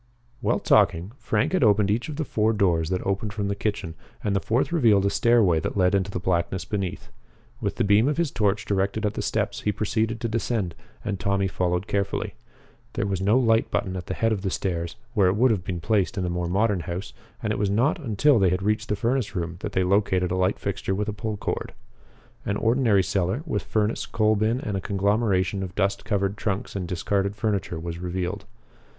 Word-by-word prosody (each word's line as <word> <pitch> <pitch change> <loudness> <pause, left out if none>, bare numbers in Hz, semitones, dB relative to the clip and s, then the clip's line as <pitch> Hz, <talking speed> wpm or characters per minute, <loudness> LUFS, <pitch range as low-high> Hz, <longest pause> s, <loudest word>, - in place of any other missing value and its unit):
While - - +1
talking, 85 +5 +3
Frank 105 -1 0
had 185 - +3
opened 105 -2 +4
each 115 +7 -1
of 150 - -5
the 155 +1 -2
four 110 -2 +1
doors 85 -6 +2
that 90 -1 -2
opened 100 +1 -1
from 100 -2 -2
the 100 - -1
kitchen, 100 -5 -2 0.3
and 100 -1 0
the - - +3
fourth 120 - 0
revealed 115 - +4
a 100 - +2
stairway 110 -8 +4
that 80 - -3
led 90 -1 +3
into 100 -1 +1
the 95 - -3
blackness 85 0 -1
beneath. 95 - -4 0.5
With - - -1
the - - 0
beam 105 +4 +4
of 150 - 0
his 170 -5 +1
torch 105 0 0
directed 100 +2 0
at 105 - 0
the - - -3
steps, - - -1
he 105 - +1
proceeded 110 +2 -1
to 115 - -2
descend, 110 -5 -1 0.3
and 100 -3 -2
Tommy 100 -1 +1
followed 90 0 -1
carefully. 100 -2 -2 0.6
There - - -1
was 95 -2 -2
no 105 +5 +4
light 115 -3 +3
button 95 -1 -1
at 90 -2 -6
the 95 - -3
head 115 0 +1
of 105 -3 -1
the 95 - -1
stairs, 85 -3 -2 0.2
where 100 -6 +4
it 90 - +2
would 125 +3 +4
have 100 -6 0
been 90 -1 -3
placed 95 +3 0
in 95 - 0
a 90 - -1
more 90 0 -2
modern 100 +1 +2
house, 85 +4 -5 0.3
and - - 0
it - - -3
was 100 -1 +1
not 120 +12 +2
until 130 0 +3
they 95 -2 +4
had 90 +2 -1
reached 105 +1 0
the 105 - +1
furnace 120 +2 -1
room 85 -1 -3
that 105 - -5
they 95 - +2
located 95 -1 +2
a - - +1
light 95 +2 +1
fixture 100 -1 -2
with 105 +2 -2
a - - -2
pull 110 0 -4
cord. - - -4 0.7
An 100 - -1
ordinary 115 -4 +3
cellar, 95 - -1
with 105 -11 -1
furnace, 110 0 -1
coal 110 0 +2
bin, 110 +4 +1
and 105 -9 -3
a 95 - -2
conglomeration 100 -1 +1
of 95 -1 -6
dust 100 0 0
covered 100 -1 0
trunks 100 -2 -3
and 95 -3 -3
discarded 100 +3 -1
furniture, 100 -6 -1
was 85 0 -5
revealed. 90 +2 -3
100 Hz, 220 wpm, -25 LUFS, 95-110 Hz, 0.7 s, opened